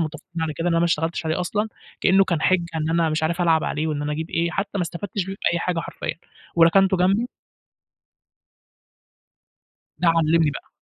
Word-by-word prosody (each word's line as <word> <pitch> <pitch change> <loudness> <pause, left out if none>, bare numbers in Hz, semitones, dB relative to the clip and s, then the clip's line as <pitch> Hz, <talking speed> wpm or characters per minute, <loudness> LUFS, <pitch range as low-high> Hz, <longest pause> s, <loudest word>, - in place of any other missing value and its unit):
متفقين 165 +1 -4
على 160 - -1
كده 165 - -4
إن - - +1
أنا 165 - +3
ما 170 - +3
اشتغلتش 165 0 -1
عليه 160 +3 0
أصلًا، 210 +4 -1 0.3
كأنه 195 +1 +5
كان 170 -4 -1
حِجة 185 -2 +3
إن 155 0 -1
أنا 165 -1 +2
مش 155 0 -1
عارف 170 +3 0
ألعب 165 -2 +3
عليه 155 +1 -1
وإن 150 -2 -2
أنا 150 0 -2
أجيب 160 +2 -4
إيه، 170 +1 0
حتى 195 +4 -2
ما - - +1
استفدتش 180 +3 -4
بيه 195 - -4 0.2
بأي 170 - 0
حاجة 170 -1 -1
حرفيّا - - -5 0.4
وركنته 190 +3 +5
جنبي 195 +7 +2 2.7
ده 175 - +1
علّمني 165 -1 +3
بقى. - - -9
170 Hz, 190 wpm, -23 LUFS, 160-180 Hz, 2.7 s, كأنه